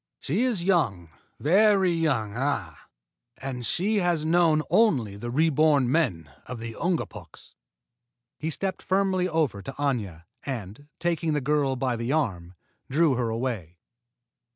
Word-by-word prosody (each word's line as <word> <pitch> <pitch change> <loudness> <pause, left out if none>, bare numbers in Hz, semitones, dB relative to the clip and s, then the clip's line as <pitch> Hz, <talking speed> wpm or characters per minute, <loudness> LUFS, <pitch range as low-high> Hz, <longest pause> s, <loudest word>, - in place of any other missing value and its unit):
She 180 - -1
is 225 -9 0
young, 110 - +1 0.3
very 195 +3 +4
young, 135 -11 0
ah! 125 - -3 0.5
And 130 -2 -5
she 205 - +1
has 175 -5 +1
known 160 -2 +3
only 130 - +3
the 120 +4 -6
reborn 150 -2 +3
men 115 - 0 0.2
of 125 - -6
the 115 0 -6
Ungapuks." 170 +6 -4 0.9
He 155 - -2
stepped 190 +4 -3
firmly 190 -1 +1
over 150 - 0
to 135 - -6
Aña, 115 - -2 0.2
and, 120 0 -6
taking 165 -2 -1
the 150 - +1
girl 140 -1 +1
by 125 -1 -1
the 115 +3 -2
arm, 95 - -2 0.3
drew 150 +2 +3
her 120 -2 -1
away. 110 -8 -3
145 Hz, 135 wpm, -26 LUFS, 115-170 Hz, 0.9 s, very